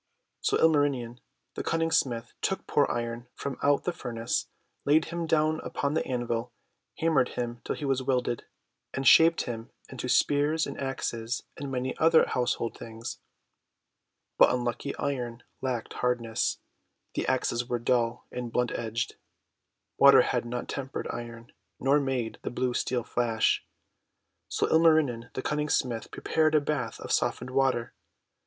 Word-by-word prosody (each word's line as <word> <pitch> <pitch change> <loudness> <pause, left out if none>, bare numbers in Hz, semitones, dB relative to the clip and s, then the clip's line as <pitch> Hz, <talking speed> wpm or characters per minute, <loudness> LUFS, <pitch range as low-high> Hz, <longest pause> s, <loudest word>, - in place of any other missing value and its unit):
So - - +1
Ilmarinen 140 -6 +2 0.3
the - - -4
Cunning 165 0 0
Smith 120 -6 0
took 190 - -1
poor 145 - +2
Iron 120 0 -3
from 140 - -5
out 145 0 +3
the 175 - -1
furnace, 115 -5 -2 0.4
laid 155 +2 +4
him 170 -1 -2
down 155 0 +2
upon 140 +1 -2
the 160 - +1
anvil, 120 -1 -2 0.5
hammered 155 -6 +2
him 120 -1 -3
till - - -2
he 150 - -5
was 135 -1 +1
welded, 125 -2 -1 0.5
and 135 -1 0
shaped 165 +4 +7
him 115 -2 -6 0.2
into - - -5
spears 150 +2 +3
and - - -6
axes 120 -3 -3
and 140 0 -5
many 130 0 -2
other 160 0 +6
household 120 -2 -1
things. 115 0 -7 1.2
But - - +8
unlucky 120 +2 -2
Iron 125 -4 -3 0.2
lacked 125 -3 -2
hardness; 120 -2 0 0.6
the - - -2
axes 120 - +1
all 120 - -11
were 120 - 0
dull 120 -1 0
and 125 -2 -5
blunt 125 +1 +1
edged. 115 +1 -3 0.8
Water 135 -2 +8
had 120 -1 -1
not 120 +1 -4
tempered 135 -1 -4
Iron, 115 +2 -8 0.3
nor 140 +2 +4
made 130 -5 -2
the - - -3
blue 125 +1 -1
Steel 125 0 0
flash. 115 -2 +1 0.9
So - - +1
Ilmarinen 155 -8 +3
the 130 - -3
Cunning 150 0 -1
Smith 120 -5 0
prepared 155 -1 +1
a - - +7
bath 145 -2 -2
of - - -6
softened 125 +1 0
water. 130 -3 +1
125 Hz, 150 wpm, -28 LUFS, 120-145 Hz, 1.2 s, But